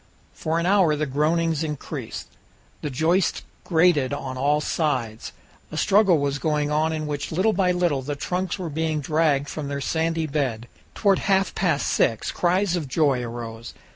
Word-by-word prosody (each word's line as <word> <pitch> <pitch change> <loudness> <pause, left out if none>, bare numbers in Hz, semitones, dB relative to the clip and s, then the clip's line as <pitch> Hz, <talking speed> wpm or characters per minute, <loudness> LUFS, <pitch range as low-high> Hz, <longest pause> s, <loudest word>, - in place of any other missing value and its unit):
For 160 +1 -2
an 170 - 0
hour 185 -5 +4
the 155 +1 -1
groanings 160 +3 +1
increased. 150 -3 -5 0.5
The 150 - -3
joists 165 +7 +1 0.2
grated 160 -6 +3
on 135 -2 -4
all 145 +3 +2
sides. 130 -8 -2 0.4
A 155 - -5
struggle 195 0 +4
was 140 0 -1
going 150 -1 0
on 155 +2 +1
in 155 -1 -3
which 145 -1 -4
little 190 +7 +2
by 185 -1 +2
little 175 -6 +1
the 145 +2 -4
trunks 180 +7 -2
were 175 -5 -5
being 160 0 -1
dragged 150 -1 +1
from 150 -1 -5
their 140 0 -3
sandy 160 +3 0
bed. 135 -6 -2 0.3
Toward 200 -3 +3
half 195 -1 +1
past 165 -6 0
six 115 -1 +1
cries 180 +1 +1
of 160 -5 -3
joy 135 -2 +2
arose. 115 -1 -7
155 Hz, 170 wpm, -24 LUFS, 140-170 Hz, 0.5 s, hour